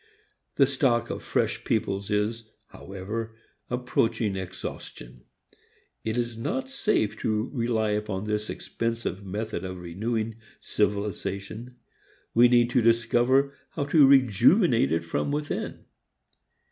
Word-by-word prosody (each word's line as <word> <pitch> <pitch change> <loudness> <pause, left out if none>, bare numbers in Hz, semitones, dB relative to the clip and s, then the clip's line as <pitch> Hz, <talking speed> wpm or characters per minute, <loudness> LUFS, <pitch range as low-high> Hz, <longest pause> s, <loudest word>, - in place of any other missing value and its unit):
The 140 - +6
stock 130 -3 +1
of - - -5
fresh - - -1
peoples 100 -2 -1
is, 110 +2 -1 0.2
however, 110 +4 -6 0.3
approaching 115 -4 0
exhaustion. 85 -9 -8 0.8
It 110 +1 -2
is 120 -1 -1
not 265 - -2
safe 215 - 0
to 110 +1 -1
rely 115 -4 0
upon 105 -2 -2
this 105 0 -2
expensive 115 -4 -3
method 105 0 -4
of 95 0 -5
renewing 110 +6 -3 0.2
civilization. 105 +3 -2 0.6
We 120 +1 +7
need 120 0 +4
to 125 - +3
discover 120 +4 +3 0.2
how 145 - -2
to 150 -4 +8
rejuvenate 130 - +5
it 85 +1 +1
from 85 +11 -2
within. 150 0 -3
115 Hz, 115 wpm, -26 LUFS, 100-120 Hz, 0.8 s, to